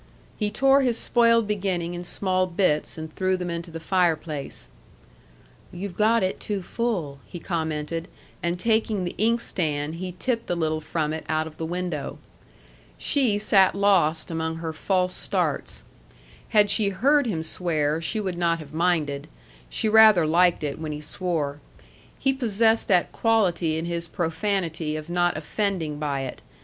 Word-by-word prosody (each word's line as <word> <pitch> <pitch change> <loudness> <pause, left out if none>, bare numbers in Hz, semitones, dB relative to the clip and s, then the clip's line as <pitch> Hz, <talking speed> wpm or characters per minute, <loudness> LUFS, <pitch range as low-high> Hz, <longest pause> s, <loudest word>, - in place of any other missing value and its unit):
He 210 -2 -1
tore 270 +5 +4
his 245 -3 +1
spoiled 230 -1 +3
beginning 185 -4 -1
in 175 0 -5
small 185 0 0
bits, 170 -5 0
and 155 0 -7
threw 185 0 0
them 180 -1 -4
into 170 +1 -5
the 165 0 -7
fireplace. 160 -4 -1 1.0
"You've 180 +1 -6
got 220 +1 +3
it 185 - -1
too 200 -3 -3
full," 180 -12 -2
he 175 - -8
commented; 160 -1 -3 0.3
and 170 +1 -1
taking 220 -2 +1
the 175 - -3
inkstand, 165 -10 0
he 185 -1 -4
tipped 230 +5 -2
a 175 - +1
little 155 -2 -1
from 155 -1 -2
it 160 - -5
out 155 0 +1
of 155 -1 -10
the 160 - -3
window. 175 -4 -4 0.8
She 255 -8 +1
sat 195 -3 +4
lost 175 -6 +2
among 160 0 -2
her 165 -1 -4
false 185 +2 0
starts. - - -2 0.7
Had 210 -2 +5
she 210 -3 +3
heard 275 +8 +3
him 165 -8 -2
swear, 160 -2 -1
she 215 +7 -1
would 185 -4 -3
not 170 -1 +2
have 155 -2 -11
minded. 155 -4 0 0.4
She 220 - -1
rather 215 -5 +7
liked 175 +1 +3
it 145 0 -3
when 155 -1 -4
he 150 - -5
swore. 150 -3 -2 0.6
He 270 - +2
possessed 225 -3 +2
that 180 -3 +3
quality 180 -8 +1
in 160 - -3
his 170 0 -3
profanity 165 -2 -2
of 155 +1 -6
not 175 -1 +1
offending 160 -2 -2
by 145 -2 -1
it. 130 -2 -6
175 Hz, 160 wpm, -25 LUFS, 160-205 Hz, 1.0 s, rather